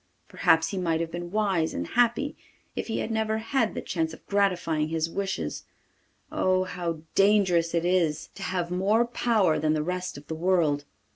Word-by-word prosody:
Perhaps 160 Hz, 0 st, +3 dB
he 195 Hz, -, -3 dB
might 165 Hz, -3 st, 0 dB
have 165 Hz, 0 st, -3 dB
been 175 Hz, 0 st, -5 dB
wise 195 Hz, -5 st, 0 dB
and 85 Hz, -, -2 dB
happy 245 Hz, +4 st, +2 dB, 0.4 s
if -, -, -3 dB
he 225 Hz, -, -2 dB
had -, -, -2 dB
never 220 Hz, 0 st, 0 dB
had 225 Hz, 0 st, 0 dB
the -, -, -4 dB
chance 160 Hz, -2 st, -2 dB
of -, -, -21 dB
gratifying 180 Hz, -6 st, +1 dB
his 165 Hz, 0 st, -1 dB
wishes! 125 Hz, -, -3 dB, 0.7 s
Oh! 185 Hz, 0 st, +2 dB
how 175 Hz, -3 st, -4 dB
dangerous 190 Hz, -5 st, +3 dB
it 170 Hz, 0 st, +1 dB
is 170 Hz, -3 st, +1 dB
to 195 Hz, -, -11 dB
have 180 Hz, -2 st, -2 dB
more 200 Hz, +6 st, +2 dB
power 225 Hz, -8 st, +2 dB
than 155 Hz, 0 st, +2 dB
the 155 Hz, -1 st, 0 dB
rest 180 Hz, -1 st, -3 dB
of 145 Hz, -, -11 dB
the 160 Hz, -, -5 dB
world! 160 Hz, -4 st, +1 dB
180 Hz, 185 wpm, -27 LUFS, 160-200 Hz, 0.7 s, Perhaps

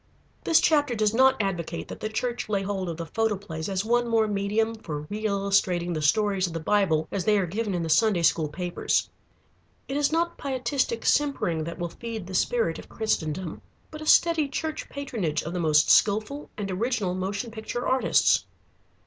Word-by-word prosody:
This 325 Hz, -, +5 dB
chapter 290 Hz, -5 st, +2 dB
does 215 Hz, -1 st, +1 dB
not 260 Hz, +2 st, +4 dB
advocate 175 Hz, -5 st, -3 dB
that -, -, -7 dB
the 215 Hz, -, -3 dB
Church 240 Hz, +1 st, -3 dB
lay 200 Hz, -2 st, 0 dB
hold 195 Hz, -2 st, -3 dB
of 165 Hz, -, -5 dB
the 165 Hz, -, -4 dB
photoplays 200 Hz, -4 st, -2 dB
as 195 Hz, +1 st, -1 dB
one 240 Hz, +1 st, +2 dB
more 225 Hz, -2 st, +2 dB
medium 210 Hz, +2 st, 0 dB
for 155 Hz, -10 st, -6 dB
reillustrating 200 Hz, -4 st, 0 dB
the 155 Hz, -, -2 dB
stories 195 Hz, +4 st, +2 dB
of 170 Hz, -, -7 dB
the 165 Hz, -, -3 dB
Bible 160 Hz, -3 st, +1 dB
as 195 Hz, -, -2 dB
they 215 Hz, -1 st, +4 dB
are 195 Hz, -, +1 dB
given 200 Hz, +3 st, -2 dB
in 170 Hz, -, -1 dB
the -, -, -3 dB
Sunday 200 Hz, 0 st, +3 dB
school 160 Hz, -1 st, +3 dB
papers. 175 Hz, +3 st, -1 dB, 0.8 s
It 270 Hz, -, -4 dB
is 290 Hz, 0 st, +2 dB
not 340 Hz, +1 st, 0 dB
pietistic 255 Hz, -3 st, -1 dB
simpering 175 Hz, -, +1 dB
that 170 Hz, -, -6 dB
will 175 Hz, 0 st, -3 dB
feed 225 Hz, +1 st, -6 dB
the 190 Hz, -, -9 dB
spirit 470 Hz, -, +1 dB
of -, -, -12 dB
Christendom, 175 Hz, -6 st, -2 dB, 0.3 s
but 310 Hz, 0 st, -8 dB
a 310 Hz, -, -7 dB
steady 330 Hz, -3 st, +4 dB
church 310 Hz, +3 st, -4 dB
patronage 225 Hz, -, -3 dB
of 165 Hz, -, -5 dB
the 180 Hz, -, -2 dB
most 155 Hz, -3 st, +4 dB
skilful 220 Hz, +8 st, +2 dB
and 200 Hz, -2 st, -3 dB
original 205 Hz, -1 st, -1 dB
motion 200 Hz, +6 st, -3 dB
picture 225 Hz, +2 st, -4 dB
artists. 260 Hz, 0 st, +3 dB
205 Hz, 185 wpm, -26 LUFS, 175-240 Hz, 0.8 s, This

